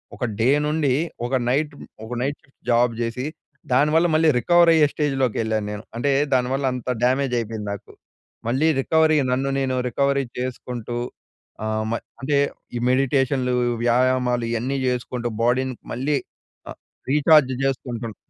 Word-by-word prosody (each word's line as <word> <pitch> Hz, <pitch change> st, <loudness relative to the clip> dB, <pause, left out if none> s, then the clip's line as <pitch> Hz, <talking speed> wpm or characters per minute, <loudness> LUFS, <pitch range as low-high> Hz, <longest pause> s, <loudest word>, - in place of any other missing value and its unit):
ఒక 130 Hz, -, -6 dB, 0.2 s
డే 115 Hz, +4 st, +3 dB, 0.2 s
నుండి 150 Hz, -3 st, +1 dB, 0.3 s
ఒక 130 Hz, -, -1 dB
నైట్‌ 145 Hz, +3 st, 0 dB, 0.3 s
ఒక 115 Hz, -, -6 dB
నైట్ 140 Hz, +3 st, -1 dB
షిఫ్ట్ 135 Hz, -, -31 dB
జాబ్ 120 Hz, 0 st, +3 dB
జేసి, 120 Hz, +2 st, -2 dB, 0.5 s
దానివల్ల 150 Hz, +5 st, +4 dB
మళ్ళీ 160 Hz, 0 st, +4 dB
రికవర్ 175 Hz, +5 st, +5 dB
అయ్యే 155 Hz, -2 st, +5 dB
స్టేజ్‌లోకెళ్ళాను 120 Hz, -7 st, 0 dB
నేను. 105 Hz, +1 st, -6 dB
అంటే 140 Hz, +4 st, 0 dB, 0.2 s
దానివల్ల 130 Hz, +2 st, +1 dB
అంత 125 Hz, 0 st, -7 dB, 0.2 s
డ్యామేజ్ 130 Hz, +1 st, +1 dB
అయిపోయింది 110 Hz, -2 st, -5 dB
నాకు. 100 Hz, -, -10 dB, 0.6 s
మళ్ళీ 135 Hz, +7 st, +2 dB
రికవరీ 160 Hz, +2 st, +3 dB
నన్ను 135 Hz, +2 st, 0 dB
నేను 130 Hz, -1 st, 0 dB
రికవరీ 140 Hz, +2 st, +1 dB, 0.2 s
చేసుకుంటూ, 125 Hz, -2 st, -4 dB, 0.7 s
ఆహ్, 110 Hz, 0 st, -1 dB
మ -, -, 0 dB, 0.3 s
అంటే 140 Hz, +2 st, +1 dB, 0.4 s
ఈ -, -, -1 dB
మెడిటేషన్లు, 130 Hz, -1 st, +1 dB, 0.3 s
వ్యాయామాలు 125 Hz, 0 st, +2 dB
ఇయన్నీ 125 Hz, +4 st, -1 dB
జేసుకుంటూ 125 Hz, -1 st, -2 dB
బాడీని 130 Hz, +2 st, +1 dB, 0.2 s
మళ్ళీ 140 Hz, +4 st, 0 dB, 0.5 s
ఆహ్, -, -, -11 dB, 0.3 s
రీచార్జ్ 150 Hz, -2 st, +5 dB
జేసుకుంటున్నా. 120 Hz, -4 st, -3 dB
130 Hz, 135 wpm, -23 LUFS, 120-140 Hz, 0.7 s, రికవర్